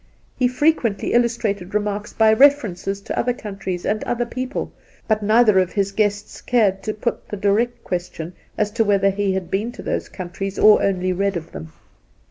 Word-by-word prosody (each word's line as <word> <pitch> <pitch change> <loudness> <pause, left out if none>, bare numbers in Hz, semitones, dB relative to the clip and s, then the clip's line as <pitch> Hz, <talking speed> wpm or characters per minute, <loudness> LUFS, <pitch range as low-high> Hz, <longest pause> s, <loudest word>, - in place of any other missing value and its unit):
He 255 - +2
frequently 250 -5 +1
illustrated 220 -5 0
remarks 210 0 -2
by 220 -1 +4
references 215 -7 +3
to - - -5
other 245 +1 +1
countries 195 -5 -6
and 215 +1 -1
other 240 0 -1
people, 255 +3 -4 0.3
but 215 -1 +1
neither 215 -1 +4
of 185 -1 0
his 200 -1 0
guests 205 0 -1
cared 205 -6 +2
to 215 - -3
put 235 +2 -3
the 205 - -5
direct 210 +5 0
question 175 -1 -5 0.2
as 210 -1 0
to 225 +1 +1
whether 200 -2 +3
he 195 0 0
had 190 -2 -4
been 215 +5 -1
to - - -10
those, - - -3
countries 190 +1 -6
or 215 0 +6
only 185 -2 0
read 195 0 0
of 165 -1 -8
them. 80 +2 -9
205 Hz, 180 wpm, -21 LUFS, 190-230 Hz, 0.3 s, or